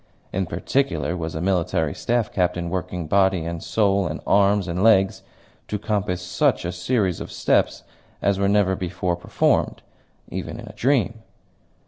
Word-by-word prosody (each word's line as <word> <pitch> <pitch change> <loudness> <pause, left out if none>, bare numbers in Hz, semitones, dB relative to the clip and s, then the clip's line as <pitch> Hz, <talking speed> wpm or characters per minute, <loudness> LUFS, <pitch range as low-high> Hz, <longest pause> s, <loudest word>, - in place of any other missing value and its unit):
In 95 -1 -1
particular 85 - -1
was 80 -2 -4
a 80 - -3
military 85 -5 0
staff 120 -2 -1
captain 90 -2 0
working 90 -1 -3
body 95 0 +2
and 85 0 -4
soul 100 -3 +1
and 75 0 -4
arms 100 -1 +3
and 90 +1 -2
legs 95 -4 +4 0.5
to 105 - -2
compass 100 -3 -2
such 90 -1 +1
a 90 - -1
series 90 0 0
of - - -7
steps - - +1 0.4
as 100 -1 +1
were 100 0 +2
never 100 -2 +3
before 90 -1 -2
performed, 90 - 0 0.5
even - - -5
in - - -8
a - - -10
dream. 120 -3 +1
95 Hz, 155 wpm, -23 LUFS, 85-100 Hz, 0.5 s, legs